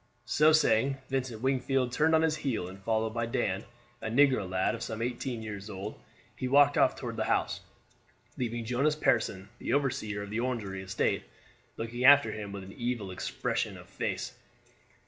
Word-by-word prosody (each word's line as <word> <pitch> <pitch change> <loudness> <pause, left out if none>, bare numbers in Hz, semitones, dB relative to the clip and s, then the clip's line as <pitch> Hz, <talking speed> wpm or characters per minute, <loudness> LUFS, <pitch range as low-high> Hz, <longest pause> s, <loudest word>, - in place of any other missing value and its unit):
So 150 +6 +5
saying, 135 -3 +3
Vincent 130 -4 -2
Wingfield 130 -1 +1
turned 160 +5 +3
on 160 - +4
his 155 -1 +2
heel, 125 -11 -2
and 95 +1 -10
followed 110 +1 0
by 115 0 -1
Dan, 100 -3 -1 0.4
a - - -3
negro 130 -5 +3
lad 95 0 +1
of - - -6
some 110 - -4
eighteen 120 0 -3
years 105 -1 -6
old, 100 +2 -6 0.4
he 130 - -3
walked 145 +2 +5
off - - +4
toward - - -6
the - - 0
house, - - 0 0.7
leaving 120 -2 -3
Jonas 135 +6 +1
Pearson, 105 -9 +1
the - - -2
overseer 110 -7 0
of 100 - -8
the 110 - -1
Orangery 110 -6 -2
estate, 95 0 0 0.6
looking 115 +2 -4
after 145 +2 +7
him 105 -2 -6
with 100 -1 -6
an 95 +1 -10
evil 120 -5 -3
expression 90 - -2
of - - -13
face. - - -3
115 Hz, 175 wpm, -30 LUFS, 105-135 Hz, 0.7 s, after